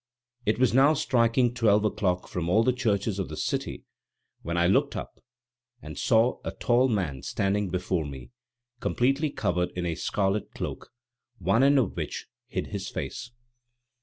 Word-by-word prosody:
It 105 Hz, -, +2 dB
was 125 Hz, -1 st, +3 dB
now 140 Hz, +4 st, +5 dB
striking 120 Hz, -2 st, +2 dB
twelve 110 Hz, -3 st, +3 dB
o'clock 95 Hz, -4 st, 0 dB
from 85 Hz, -2 st, -3 dB
all 110 Hz, +5 st, +4 dB
the 125 Hz, -, +3 dB
churches 105 Hz, -5 st, 0 dB
of 95 Hz, -, -3 dB
the -, -, -7 dB
city, -, -, -3 dB, 0.6 s
when 85 Hz, +1 st, -3 dB
I 85 Hz, -, +3 dB
looked 95 Hz, -, +2 dB
up -, -, -7 dB, 0.6 s
and -, -, -9 dB
saw 115 Hz, +1 st, +2 dB
a -, -, -3 dB
tall 125 Hz, 0 st, +2 dB
man 90 Hz, -, -1 dB
standing 100 Hz, 0 st, -1 dB
before 90 Hz, -3 st, -1 dB
me 70 Hz, -, -9 dB, 0.5 s
completely 135 Hz, +6 st, +1 dB
covered 90 Hz, -8 st, -1 dB
in 90 Hz, -1 st, -2 dB
a 85 Hz, -, 0 dB
scarlet 100 Hz, +4 st, -1 dB
cloak, -, -, -5 dB, 0.5 s
one 100 Hz, +5 st, +2 dB
end 140 Hz, +1 st, +5 dB
of 120 Hz, -8 st, +1 dB
which -, -, -4 dB, 0.2 s
hid -, -, -3 dB
his -, -, -4 dB
face. 125 Hz, -, -5 dB
105 Hz, 165 wpm, -27 LUFS, 90-125 Hz, 0.6 s, now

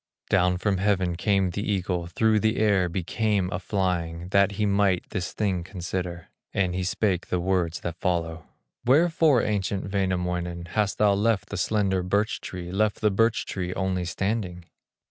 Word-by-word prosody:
Down 90 Hz, -2 st, +3 dB
from 95 Hz, +1 st, 0 dB
heaven 95 Hz, -3 st, +1 dB
came 95 Hz, 0 st, +1 dB
the 100 Hz, -, -3 dB
eagle, 90 Hz, -4 st, -1 dB
Through 110 Hz, +5 st, +2 dB
the 110 Hz, +1 st, +1 dB
air 100 Hz, -4 st, +3 dB
he 90 Hz, +1 st, -2 dB
came 100 Hz, -1 st, 0 dB
a 90 Hz, -, -2 dB
flying, 90 Hz, -3 st, -2 dB
That 100 Hz, +1 st, +3 dB
he 105 Hz, +1 st, 0 dB
might 100 Hz, -3 st, +2 dB
this 90 Hz, -3 st, -3 dB
thing 95 Hz, -5 st, -1 dB
consider; 90 Hz, -1 st, -5 dB, 0.3 s
And 95 Hz, -2 st, +1 dB
he 90 Hz, +1 st, -2 dB
spake 90 Hz, 0 st, 0 dB
the 90 Hz, -, 0 dB
words 90 Hz, -2 st, 0 dB
that 85 Hz, 0 st, -5 dB
follow: 80 Hz, -2 st, -2 dB, 0.4 s
"Wherefore, 155 Hz, -1 st, +4 dB
ancient 100 Hz, -1 st, -2 dB
Wainamoinen, 90 Hz, -3 st, -1 dB
Hast 105 Hz, -2 st, 0 dB
thou 105 Hz, -1 st, +4 dB
left 105 Hz, +1 st, +1 dB
the -, -, -5 dB
slender 95 Hz, -1 st, +1 dB
birch 100 Hz, +5 st, 0 dB
tree, 90 Hz, -1 st, -6 dB
Left 105 Hz, +2 st, +1 dB
the 105 Hz, -, +2 dB
birch 115 Hz, +3 st, +2 dB
tree 90 Hz, -2 st, -4 dB
only 95 Hz, -2 st, -1 dB
standing?" 90 Hz, -1 st, -2 dB
95 Hz, 165 wpm, -26 LUFS, 90-105 Hz, 0.4 s, Wherefore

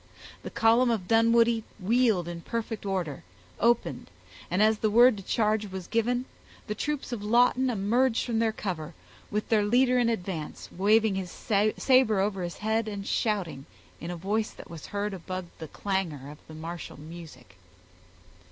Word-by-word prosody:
The -, -, -6 dB
column 230 Hz, +3 st, +3 dB
of 215 Hz, -6 st, -1 dB
Dunwoodie 230 Hz, +1 st, +4 dB, 0.2 s
wheeled 215 Hz, -3 st, +2 dB
in 170 Hz, -1 st, -6 dB
perfect 225 Hz, 0 st, -4 dB
order, 180 Hz, -7 st, -2 dB, 0.4 s
opened, 235 Hz, +1 st, +1 dB, 0.4 s
and, 185 Hz, +4 st, +2 dB
as 215 Hz, 0 st, +3 dB
the 215 Hz, -, +1 dB
word 240 Hz, +3 st, +6 dB
to 195 Hz, -, -8 dB
charge 215 Hz, +1 st, +1 dB
was 190 Hz, -2 st, -7 dB
given, 245 Hz, +2 st, 0 dB, 0.4 s
the 210 Hz, -, -3 dB
troops 290 Hz, +5 st, -3 dB
of 225 Hz, -4 st, -4 dB
Lawton 245 Hz, +4 st, +3 dB
emerged 230 Hz, +3 st, +1 dB
from 230 Hz, -2 st, -1 dB
their 225 Hz, -1 st, +2 dB
cover, 170 Hz, -7 st, -5 dB, 0.3 s
with 210 Hz, +1 st, -2 dB
their 215 Hz, -2 st, +3 dB
leader 250 Hz, +4 st, +3 dB
in 240 Hz, -1 st, +3 dB
advance, 180 Hz, -8 st, -4 dB
waving 210 Hz, +3 st, +3 dB
his 190 Hz, -2 st, -3 dB
saber 215 Hz, +3 st, +2 dB
over 195 Hz, -1 st, 0 dB
his 175 Hz, -1 st, -5 dB
head, 220 Hz, +1 st, 0 dB
and 200 Hz, -2 st, -5 dB
shouting, 185 Hz, -, -1 dB, 0.3 s
in 170 Hz, -, -6 dB
a 175 Hz, -, -3 dB
voice 205 Hz, +5 st, -1 dB
that -, -, -13 dB
was 165 Hz, -2 st, -9 dB
heard 205 Hz, 0 st, -3 dB
above 185 Hz, 0 st, -5 dB
the 160 Hz, -, -6 dB
clangor 165 Hz, -8 st, -3 dB
of 150 Hz, -, -13 dB
the 155 Hz, -, -10 dB
martial 165 Hz, 0 st, -7 dB
music. 150 Hz, -, -12 dB
210 Hz, 165 wpm, -28 LUFS, 180-230 Hz, 0.4 s, word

